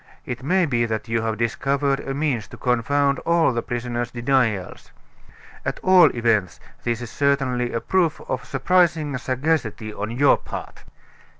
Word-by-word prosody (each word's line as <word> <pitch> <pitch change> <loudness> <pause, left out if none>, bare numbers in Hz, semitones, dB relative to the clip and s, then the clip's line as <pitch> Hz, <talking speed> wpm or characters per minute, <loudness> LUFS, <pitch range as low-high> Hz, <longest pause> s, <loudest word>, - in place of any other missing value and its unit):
It 125 0 -5
may 180 +7 +2
be 120 -5 0
that 110 +1 -3
you 115 0 +1
have 110 -1 -2
discovered 135 +4 0
a 135 - -4
means 140 -7 -1
to - - -12
confound 140 +3 +1
all 170 -5 +2
the 115 - -1
prisoner's 120 -1 -3
denials. 120 -6 -1 0.7
At - - -3
all 185 -3 +7
events, 115 -6 +1 0.2
this 120 0 -1
is 120 - -7
certainly 135 -4 0
a 115 - -2
proof 175 -5 +1
of 125 -2 -3
surprising 155 +2 +1
sagacity 130 -5 -1
on 105 +1 -4
your 135 +5 +4
part." - - -9
125 Hz, 155 wpm, -22 LUFS, 115-145 Hz, 0.7 s, all